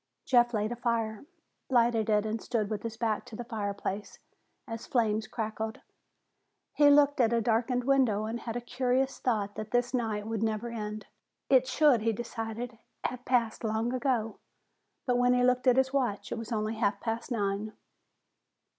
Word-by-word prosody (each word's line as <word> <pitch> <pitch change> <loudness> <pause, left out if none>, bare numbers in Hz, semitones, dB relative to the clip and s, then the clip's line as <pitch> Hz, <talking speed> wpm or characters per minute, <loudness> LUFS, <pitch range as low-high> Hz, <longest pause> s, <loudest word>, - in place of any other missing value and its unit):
Jeff 240 -2 +4
laid 215 -1 -1
a - - -2
fire, 230 -1 -1 0.4
lighted 235 -3 +3
it 210 0 +3
and 220 +1 -2
stood 220 -4 -1
with 210 -2 -2
his 225 -1 -5
back 225 -2 0
to 220 - -11
the 240 - -5
fireplace 205 -3 -4 0.5
as 230 0 -6
flames 220 -4 +1
crackled. 220 -1 -4 0.9
He 290 -1 +6
looked 285 -1 +5
at 230 -1 +3
a 235 - +3
darkened 235 +2 +1
window 245 -6 +2
and 225 +2 -3
had 230 0 -5
a 245 - -2
curious 260 +2 0
thought 210 -5 0
that 215 +1 -6
this 245 +1 +1
night 220 -4 -1
would 220 -1 -3
never 220 +1 -1
end. 215 -2 -5 0.5
It 260 -1 +5
should, 260 -3 +4
he 225 +1 +1
decided, 225 +1 -5 0.2
have 250 0 -3
passed 235 -3 +1
long 225 +2 0
ago. 250 -4 -1 0.7
But 245 -2 +2
when 245 0 +4
he 250 - +3
looked 250 +1 +2
at 250 0 +5
his 265 0 +2
watch, 210 -7 -1
it - - -1
was 230 +1 -7
only 215 -1 -1
half 205 -3 +1
past 225 +3 -3
nine. 205 -1 -1
230 Hz, 175 wpm, -29 LUFS, 215-245 Hz, 0.9 s, He